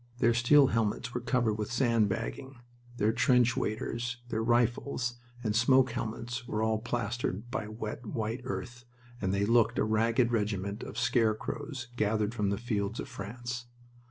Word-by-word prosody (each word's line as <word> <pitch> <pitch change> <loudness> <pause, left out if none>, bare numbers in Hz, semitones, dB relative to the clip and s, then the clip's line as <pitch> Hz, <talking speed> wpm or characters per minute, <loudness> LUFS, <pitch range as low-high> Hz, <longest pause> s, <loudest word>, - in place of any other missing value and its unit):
Their 120 -1 +4
steel 130 +5 +6
helmets 115 +2 0
were 125 - -2
covered 115 -3 +1
with 105 - -3
sand 115 -4 +3
bagging, 120 +5 -4 0.4
their 105 0 +3
trench 125 -1 +4
waders, 115 +3 -2
their 110 -1 -1
rifles, 120 +1 +1 0.3
and 105 -2 0
smoke 130 +2 +5
helmets 120 +1 -4
were 110 -2 -1
all 110 -1 +1
plastered 115 -1 -3
by 120 -5 -2
wet, 110 +1 -6
white 110 +2 -2
earth, 120 -1 -5 0.4
and 95 -2 0
they 100 +1 +1
looked 115 0 +3
a - - +3
ragged 115 +3 +2
regiment 100 -2 -1
of - - -7
scarecrows 125 +3 0
gathered 105 0 +1
from 105 -4 0
the 100 - 0
fields 105 -1 -2
of - - -4
France. 120 +1 -6
115 Hz, 155 wpm, -30 LUFS, 110-120 Hz, 0.4 s, steel